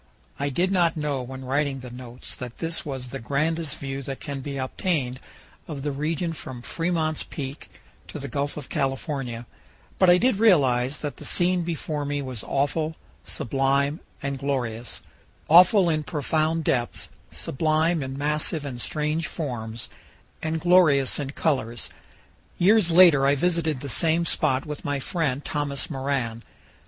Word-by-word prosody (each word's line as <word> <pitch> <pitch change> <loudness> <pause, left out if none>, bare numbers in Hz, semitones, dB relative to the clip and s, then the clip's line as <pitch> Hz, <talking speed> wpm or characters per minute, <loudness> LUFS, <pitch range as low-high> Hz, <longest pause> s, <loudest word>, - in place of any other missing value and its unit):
I 140 +1 0
did 175 +7 +1
not 170 -4 +3
know 145 -3 -1
when 130 +1 -7
writing 135 0 0
the 125 -1 -8
notes 125 0 -6
that 125 -2 -7
this 165 0 -1
was 130 -4 -5
the 135 - -5
grandest 155 +5 -1
view 135 0 -4
that 135 0 -6
can 140 -2 -5
be 140 +1 -5
obtained 130 -1 -1 0.5
of 145 -4 -5
the 145 - -1
region 160 +4 -1
from 130 -6 -7
Fremont's 165 -1 -1
Peak 140 0 -6 0.4
to - - -7
the 140 -1 -5
Gulf 145 +1 -2
of 145 - -6
California, 135 -3 -2 0.5
but 185 - +6
I 175 - +8
did 240 +1 +2
realize 140 - +4
that 145 - -4
the - - -10
scene 180 0 +2
before 160 -3 -3
me 145 0 -1
was 130 -6 -5
awful, 155 +3 0 0.3
sublime, 135 - +1 0.2
and 140 -1 -2
glorious 125 -4 -2 0.5
awful 180 +3 +7
in 155 -2 +1
profound 155 +1 0
depths, 120 -4 -1 0.2
sublime 155 +3 +1
in 135 0 -4
massive 150 +2 0
and 125 -4 -4
strange 150 +3 -1
forms, 115 -7 -4 0.5
and 160 0 -1
glorious 160 -7 +4
in 140 -2 -3
colors. 130 -6 -1 0.7
Years 200 0 +5
later 165 -6 +7
I 140 - +4
visited 160 -3 0
the 140 - -5
same 165 +5 +2
spot 130 -4 +2
with 150 -1 -6
my 145 -1 -1
friend 145 -3 -1
Thomas 145 +1 -2
Moran. 130 -5 -2
145 Hz, 155 wpm, -25 LUFS, 135-160 Hz, 0.7 s, I